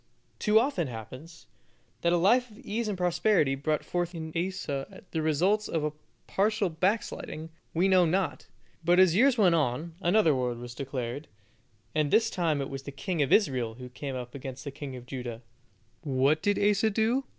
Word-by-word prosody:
too 215 0 +5
often 225 - 0
happens, 130 +8 -9 0.6
that 170 - +2
a 175 - +4
life 240 +8 +3
of 210 - -16
ease 230 -3 -3
and 205 -3 -2
prosperity 180 -4 +2
brought 150 +3 -1
forth 175 0 -2
in 160 -1 -6
Asa 175 -2 -3
the 160 - -1
results 180 +8 +2
of 150 -2 -1 0.3
partial 205 -1 +1
backsliding, 165 -2 -2 0.2
we 180 +4 +3
know 185 -2 +5
not; 180 +2 0 0.4
but 175 +2 +4
as 185 -3 +6
years 255 +4 +5
went 190 -6 +5
on, 155 +1 0
another 175 -3 +4
war 125 -2 -1
was 120 0 -8
declared, 130 +1 -5 0.7
and 155 -2 +1
this 225 +8 +3
time 160 -5 0
it 135 - -4
was 135 0 -5
the 140 - -8
king 170 +3 -2
of 140 - +1
Israel 130 - +2
who 125 +1 -9
came 130 +2 -6
up 125 -1 -6
against 130 -1 -7
the 140 - -5
king 135 -1 -7
of 125 -1 -9
Judah. 125 -2 -6 0.6
What 140 +1 +2
did 205 -1 +1
Asa 210 +1 +3
do? 225 +6 +1
165 Hz, 180 wpm, -28 LUFS, 135-195 Hz, 0.7 s, as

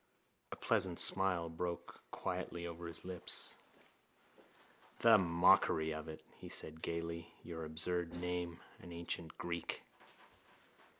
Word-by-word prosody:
A - - -3
pleasant 95 -6 +2
smile 95 -3 +5
broke 85 +1 -4
quietly 85 0 -3
over 85 0 -5
his 85 - -4
lips. 90 -2 -2 1.5
—The 115 -2 +8
mockery 85 -2 +5
of 80 +1 -5
it! 80 -1 -8 0.2
he - - -8
said 80 0 -2
gaily. 85 0 -3
Your 80 -1 -5
absurd 85 +2 0
name, 90 -1 -3 0.2
an 85 - -10
ancient 85 -1 -4
Greek! 85 -1 -3
85 Hz, 115 wpm, -37 LUFS, 85-90 Hz, 1.5 s, The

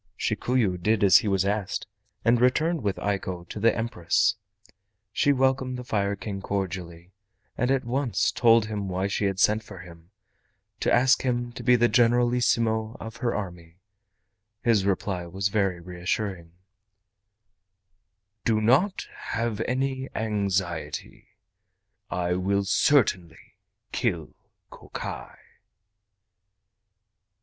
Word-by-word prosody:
Shikuyu 110 -4 0
did 110 +1 +2
as 95 - +8
he 110 - -1
was 95 -1 +1
asked, 100 -1 -2 0.4
and 120 0 +4
returned 155 +6 +2
with 100 -3 -1
Eiko 95 -3 -3
to - - -6
the 115 +2 +3
Empress. 115 -7 +1 0.8
She 145 - +3
welcomed 130 -1 +1
the 125 - -6
Fire 100 -4 -1
King 100 0 -6
cordially, 90 -3 -4 0.4
and 125 - 0
at 135 -2 +1
once 125 0 0
told 115 -2 +4
him 105 -3 -4
why 95 +1 -1
she 100 +1 -1
had 95 -1 -1
sent 105 +2 +3
for 105 -2 -11
him—to 90 +3 -9
ask 130 +4 +4
him 120 -2 -1
to 120 - -8
be 125 +1 +4
the 120 0 +4
Generalissimo 120 -2 +2
of 115 +1 -8
her 120 0 -1
army. 85 -4 -7 0.9
His 110 -5 +3
reply 95 -2 -1
was 95 +3 -1
very 95 -4 0
reassuring: 90 0 -4 1.9
"Do 110 -2 +2
not 135 - +2 0.3
have 115 -2 -1
any 130 +1 -1
anxiety. 95 -8 -2 0.8
I 90 -1 -1
will 100 +2 0
certainly 95 - +1 0.4
kill 85 - -2 0.4
Kokai." - - -8
105 Hz, 120 wpm, -26 LUFS, 95-120 Hz, 1.9 s, as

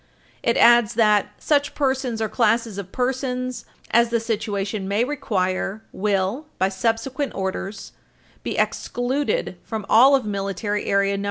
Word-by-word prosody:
It 235 - +1
adds 235 -3 +5
that 210 -3 +4
"[s]uch 285 -2 +1
persons 265 -5 0
or - - 0
classes 225 -2 +1
of 195 -1 -8
persons 255 0 -2 0.3
as 235 0 +4
the 235 0 +1
situation 210 -3 -3
may 205 +4 +1
require" 210 -7 -2
will, 205 +8 -1
by 190 +1 +2
subsequent 235 +8 -2
orders, 190 +2 -4 0.5
"be - - -4
excluded 275 - -1
from 220 -3 -5
all 260 +5 +7
of 265 -4 0
Military 205 +1 -2
Area 200 0 +1
No. - - -3
225 Hz, 140 wpm, -22 LUFS, 200-255 Hz, 0.5 s, all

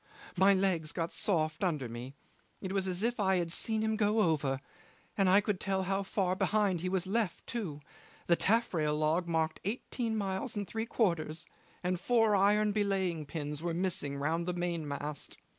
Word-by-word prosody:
My 195 +2 +5
legs 180 -5 +1
got 165 -1 -2
soft 155 -4 0
under 155 -8 0
me. 120 +4 -7 0.4
It 190 - -5
was 195 -1 0
as 185 +2 -2
if 240 0 0
I 190 -2 +3
had 170 -2 -1
seen 220 +4 0
him 220 0 +1
go 215 0 +2
over; 145 -7 +1 0.6
and 195 -2 +3
I 195 +2 +6
could 205 -2 -1
tell 190 -1 0
how 195 +1 0
far 190 -2 0
behind 200 -3 +1
he 185 - -1
was 185 -1 0
left 205 -1 -1
too. 175 -11 -4 0.4
The 170 - +4
taffrail 170 -9 +1
log 160 +3 +1
marked 160 -1 0
eighteen 225 +2 -2
miles 195 +4 -2
and 205 - -1
three 225 +1 -3
quarters, 165 -8 0 0.4
and 180 0 0
four 225 +1 +3
iron 210 +2 +4
belaying 190 -7 0
pins 150 -1 -4
were 170 -1 -2
missing 175 -6 -1
round 165 +4 -1
the 180 - 0
mainmast. 150 -4 -3
185 Hz, 175 wpm, -32 LUFS, 160-205 Hz, 0.6 s, I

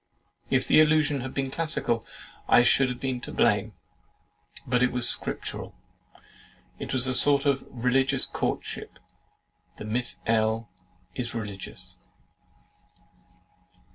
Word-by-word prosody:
If - - +1
the - - +6
allusion 150 -3 +2
had 130 +1 -5
been 135 -1 -2
classical 155 -7 -1 0.4
I 120 - +6
should 130 +2 +4
have 125 - -5
been 130 -2 -3
to - - -7
blame; - - +1 0.9
but 125 0 +1
it 125 - +3
was 125 -1 +3
scriptural, - - -2 1.0
it - - -6
was 130 0 +3
a 130 - 0
sort 140 +2 +4
of 140 -2 0
religious 130 +2 +1
courtship, - - -4 0.8
and 105 - -7
Miss 120 +1 -1
L. 110 -1 0 0.4
is 120 -2 -3
religious! 95 -4 -7
125 Hz, 120 wpm, -26 LUFS, 115-135 Hz, 1.0 s, the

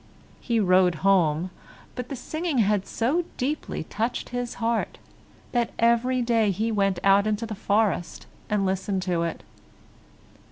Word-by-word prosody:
He 235 -2 0
rode 185 -3 +4
home, 180 -3 +3 0.4
but 250 -1 -6
the 275 - -4
singing 315 +4 -3
had 210 -3 +2
so 280 +10 0
deeply 280 - -2
touched 225 +8 -3
his 245 -1 -4
heart, 230 0 -1 0.5
that 240 -2 0
every 235 +2 +2
day 230 -3 +2
he 215 +4 -1
went 195 -3 +1
out 200 +1 +5
into 215 +2 -1
the 220 - -5
forest 200 -3 0 0.2
and 210 -2 +1
listened 190 0 -1
to 175 -3 0
it. 170 -1 -3
215 Hz, 145 wpm, -25 LUFS, 190-240 Hz, 0.5 s, out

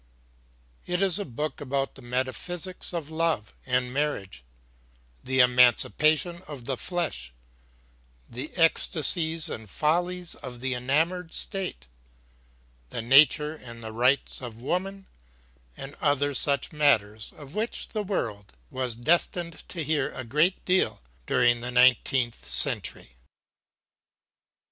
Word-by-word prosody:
It 180 0 -1
is 195 -1 +3
a 205 - -3
book 150 +4 -4
about 135 0 -2
the - - -13
metaphysics 130 +9 -3
of 165 -3 -5
love 160 -9 -1
and 125 -1 0
marriage, 115 - -3 0.8
the 130 0 +3
emancipation 125 - +3
of 140 -5 -9
the 135 - -2
flesh, 155 - -3 1.0
the 130 +6 -7
ecstasies 165 0 +2
and 110 -2 -7
follies 175 - -1
of 125 -2 -9
the 130 +1 -1
enamored 160 +8 0
state, 190 - -3 1.0
the 115 - -5
nature 150 +4 +5
and 115 -6 -11
the 110 - -6
rights 125 +6 +1
of 115 -3 -8
woman, 190 +8 -3 0.7
and 135 +1 -8
other 145 -1 +1
such 140 +3 +2
matters 110 -8 +1
of 145 -1 -12
which 220 +4 -3
the 215 - -3
world 110 - -4 0.2
was 130 -3 -3
destined 170 +5 0
to 170 - -3
hear 145 -2 0
a 130 - -5
great 150 +10 +1
deal 185 0 +2 0.3
during 120 -1 +3
the 120 +1 -5
nineteenth 125 -1 +2
century. - - +3
140 Hz, 120 wpm, -26 LUFS, 125-165 Hz, 1.0 s, nature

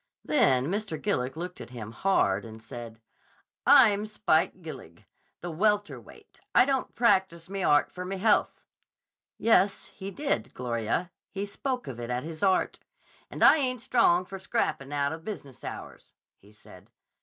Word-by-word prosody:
Then 130 -1 +3
Mr. 195 -1 -3
Gillig 130 -1 -1
looked 180 -3 -6
at 115 - -9
him 115 -4 -8
hard 110 - +1
and 110 -1 -10
said, 115 0 -9 0.7
'I'm 215 -6 +6
Spike 185 -4 0
Gillig, 130 - -10 0.4
the 175 - -5
welter 205 +4 0
weight. - - -18 0.2
I - - +7
don't 270 -1 -1
practice 190 -7 +1
me 195 -1 -3
art 145 -4 +3
for 180 - -6
me 190 +1 -4
health'—Yes, 205 0 0
he 195 0 -7
did, 240 - -2
Gloria; 120 +7 -2 0.2
he 200 0 -4
spoke 250 +5 -4
of 125 -3 -7
it 120 0 -6
as 125 0 -2
his 160 0 -8
art!—'And 190 -2 -2
I - - +8
ain't 255 -5 -1
strong 185 -8 +3
for 195 +1 -8
scrappin' 185 - -2
out 145 -1 0
of 160 0 -7
business 145 - -8
hours,' - - -9 0.3
he 100 - -20
said. 105 - -17
175 Hz, 155 wpm, -28 LUFS, 130-205 Hz, 0.7 s, I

